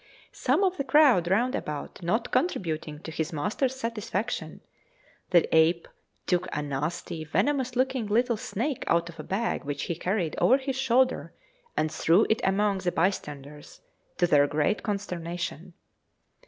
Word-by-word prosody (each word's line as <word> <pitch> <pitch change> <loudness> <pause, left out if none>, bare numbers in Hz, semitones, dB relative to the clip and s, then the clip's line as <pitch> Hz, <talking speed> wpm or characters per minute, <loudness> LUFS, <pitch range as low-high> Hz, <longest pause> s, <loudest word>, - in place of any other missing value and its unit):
Some 280 +10 +1
of 375 -1 +1
the 275 - -1
crowd 265 - +5
round 235 +8 +2
about 150 - -5
not 220 +8 -1
contributing 160 - -1
to 160 - -6
his 160 +1 -3
master's 210 - -1
satisfaction, 230 -4 -3 0.7
the 175 -2 +4
ape 165 +1 +4 0.4
took 180 0 +1
a 150 - -2
nasty 150 +3 -3
venomous 255 - 0
looking 255 -3 0
little 235 +3 +2
snake 245 +6 -3
out 170 0 +2
of 165 -1 -12
a - - -5
bag 210 +7 -2
which 140 0 -4
he 170 - -2
carried 180 -1 -1
over 260 - +5
his 270 -1 -3
shoulder, 255 0 +1 0.4
and 155 - +1
threw 175 +6 +3
it 220 - +1
among 195 0 +2
the 180 -1 -1
bystanders, 150 -5 -3 0.4
to 175 - +3
their 145 -4 +4
great 150 +8 0
consternation. 175 -4 -4
190 Hz, 150 wpm, -27 LUFS, 160-245 Hz, 0.7 s, crowd